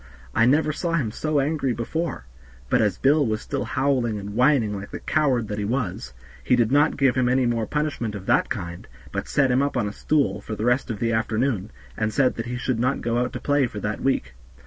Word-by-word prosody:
I 115 - +4
never 150 +3 +3
saw 170 +2 -2
him 135 -10 0
so 155 +5 0
angry 140 -2 0
before; 135 - -3 0.5
but - - +4
as 105 -4 +1
Bill 145 +6 +4
was 110 -4 -1
still 140 +3 -3
howling 130 -5 0
and 100 0 -6
whining, 125 -3 +3
like 100 0 -7
the - - -6
coward 135 -7 +1
that 105 0 -4
he - - -1
was, 100 - -3 0.3
he 125 - +3
did 120 -1 +2
not 145 +2 +3
give 135 -3 +3
him 125 -1 +1
any 130 0 +2
more 115 -2 0
punishment 145 -8 -2
of 95 -2 -7
that - - +2
kind, 85 0 -5 0.2
but - - -3
set 135 -3 +2
him 125 +2 +3
up 140 0 0
on 105 - 0
a 105 - -5
stool 150 +3 0
for 110 - -5
the 105 +2 -3
rest 125 +2 +1
of 110 - -3
the 115 +2 0
afternoon, 110 -1 0 0.3
and 110 -1 -1
said 130 +1 +2
that 115 +1 -4
he 125 +1 -3
should 125 -2 -1
not 130 +3 0
go 120 0 0
out 125 +1 -1
to - - -4
play 145 -2 +2
for 105 - -7
that 105 0 -3
week. 100 - 0
125 Hz, 235 wpm, -24 LUFS, 110-140 Hz, 0.5 s, I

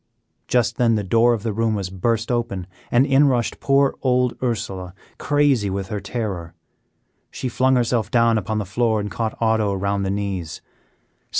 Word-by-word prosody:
Just 120 -2 +1
then 115 -2 +3
the 105 - -1
door 115 +5 +3
of 105 - -7
the 115 -2 -2
room 110 0 0
was 95 -3 -4
burst 115 +5 -1
open, 120 -7 -2 0.3
and 120 +3 +4
in 140 +1 +4
rushed 120 -3 0
poor 140 0 +3
old 125 -1 +1
Ursela, 95 -7 -3 0.2
crazy 145 -8 +2
with 95 0 -4
her 105 - -3
terror. 95 -6 -4 0.7
She - - -5
flung 130 +1 +2
herself 120 -3 +1
down 115 -1 +3
upon 110 +2 -3
the 105 - -2
floor 110 +3 0
and 105 -1 -4
caught 110 +3 -3
Otto 110 -2 +2
around 100 +1 -1
the 95 - -1
knees. 95 -5 -3
110 Hz, 175 wpm, -21 LUFS, 100-120 Hz, 0.7 s, and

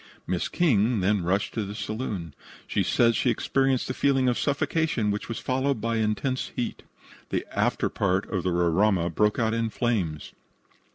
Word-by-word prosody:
Miss 90 -1 -1
King 120 - +2
then 100 +1 +2
rushed 95 +4 0
to 110 - -1
the 100 +1 -6
saloon. 105 - -4 0.3
She - - 0
says 115 -1 +3
she 125 - +2
experienced 135 +2 +1
a 130 - -2
feeling 135 -1 +2
of 125 - +1
suffocation, 145 -6 0
which 105 +3 -4
was 115 - -3
followed 130 0 0
by 115 +1 -1
intense 110 +5 -1
heat. 120 - -3 0.5
The - - -1
afterpart 95 0 0
of 95 -4 0
the 90 - -1
Roraima 90 +1 +2
broke 105 +4 +2
out 110 -1 +1
in 115 -1 0
flames. 100 - -2
110 Hz, 165 wpm, -26 LUFS, 95-125 Hz, 0.5 s, says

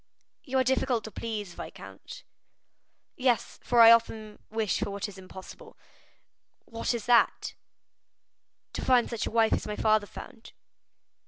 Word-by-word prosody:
"You 265 -2 -2
are 260 - +4
difficult 255 -2 0
to 220 - -8
please, 210 -3 -5
viscount." - - -10 0.9
"Yes, 250 -2 0
for 240 -1 +3
I 230 0 +10
often 220 -2 +1
wish 220 -2 -1
for 210 0 -2
what 200 +1 -4
is 195 -2 -11
impossible." 190 0 -12 0.9
"What 230 +1 -3
is 230 - -5
that?" 240 -1 +3 1.2
"To - - -4
find 250 -2 +3
such 235 -2 -3
a - - -4
wife 225 -1 +3
as - - -1
my 210 - -3
father 215 -1 +2
found." 225 +2 -12
225 Hz, 145 wpm, -28 LUFS, 210-235 Hz, 1.2 s, I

